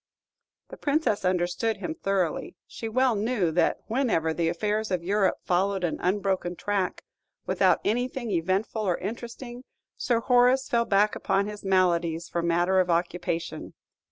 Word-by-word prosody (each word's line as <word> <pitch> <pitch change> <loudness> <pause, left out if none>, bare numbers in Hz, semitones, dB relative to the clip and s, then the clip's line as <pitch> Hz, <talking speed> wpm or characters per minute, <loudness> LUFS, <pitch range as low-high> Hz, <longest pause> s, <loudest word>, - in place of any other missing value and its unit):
The - - -10
Princess 290 -8 0
understood 185 +4 0
him 180 -5 -4
thoroughly. 185 -1 -1
She 225 - -6
well 255 +2 +2
knew 210 -5 0
that 175 - +1
whenever 220 - 0
the 165 0 0
affairs 210 +5 -1
of 180 -3 -1
Europe 195 +1 +1
followed 190 +1 0
an 170 - -1
unbroken 190 -2 0
track, 200 0 -2 0.4
without - - +3
anything 245 0 -1
eventful 190 +5 0
or 185 -5 0
interesting, 240 +4 -7 0.3
Sir 235 -2 +1
Horace 250 +2 +4
fell 235 -1 +1
back 205 0 +3
upon 195 +1 0
his 210 0 -7
maladies 175 -3 +1
for 170 - -1
matter 175 +3 +2
of 180 -1 +1
occupation. 170 0 -2
195 Hz, 145 wpm, -26 LUFS, 175-225 Hz, 0.4 s, Horace